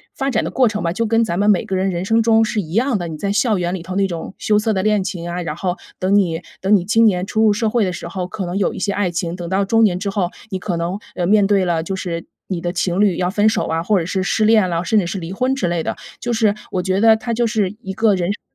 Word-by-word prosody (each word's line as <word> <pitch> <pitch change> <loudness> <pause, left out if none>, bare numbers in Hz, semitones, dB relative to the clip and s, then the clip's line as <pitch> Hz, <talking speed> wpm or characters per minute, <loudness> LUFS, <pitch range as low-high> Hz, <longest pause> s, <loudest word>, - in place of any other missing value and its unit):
发 270 -1 -1
展 - - 0
的 - - -3
过 255 -2 +3
程 210 -2 -2
吧， 170 0 0
就 230 +4 -1
跟 230 +1 +3
咱 175 -4 -2
们 205 +1 +3
每 195 - +3
个 190 - -2
人 190 +1 +1
人 180 0 -3
生 225 +2 +3
中 225 0 +4
是 210 -1 -1
一 160 0 -9
样 245 +1 +2
的， 175 - -4
你 160 -2 -6
在 200 +3 -2
校 220 0 +2
园 175 0 -1
里 185 - -4
头 185 +2 -6
那 195 0 +2
种 175 +1 -6
羞 210 -1 +2
涩 220 +1 0
的 190 - -1
恋 210 -2 +2
情 175 -2 -5
啊， 175 +1 -3
然 155 -3 -4
后 180 0 -2 0.2
等 185 +2 +1
你 175 -4 +1 0.2
等 195 +2 +4
你 180 -3 +1
青 225 +3 +4
年 180 -3 +2
初 220 +2 -1
入 220 - +5
社 220 +2 0
会 230 0 +1
的 185 - 0
时 170 - -6
候， 180 +1 -4
可 190 +1 -5
能 175 +2 -4
有 195 - +1
一 - - -6
些 200 - 0
爱 200 -2 0
情， 170 0 -3
等 175 -2 -6
到 195 +1 +1
中 225 +3 +3
年 190 -5 +3
之 200 0 -2
后， 185 -3 0 0.2
你 190 - -2
可 180 -2 -3
能， 175 +4 -2 0.2
呃， 175 - -1
面 205 +1 +4
对 195 -2 +2
了 170 -2 0
就 190 +4 -4
是 170 -3 -4 0.2
你 180 -3 -3
的 175 - -2
情 180 +2 0
侣 200 -5 +3
要 180 0 0
分 210 +1 +3
手 - - -1
啊， 165 0 -1
或 205 +3 +2
者 165 - -3
是 190 +1 -1
失 215 +2 +1
恋 215 -4 +4
了， 170 0 -1
甚 210 +4 +2
至 175 - -1
是 195 - -3
离 170 +1 -6
婚 255 +6 0
之 185 -9 -1
类 170 -1 -1
的， - - -3 0.2
就 240 - -3
是 220 -3 +2 0.2
我 180 - -1
觉 190 +1 0
得 225 0 +7
它 220 +2 -3
就 235 +1 +1
是 210 -3 -1
一 190 0 -5
个 220 0 +3
人 180 +1 -1
生 205 - -5
195 Hz, 340 characters per minute, -19 LUFS, 175-215 Hz, 0.2 s, 得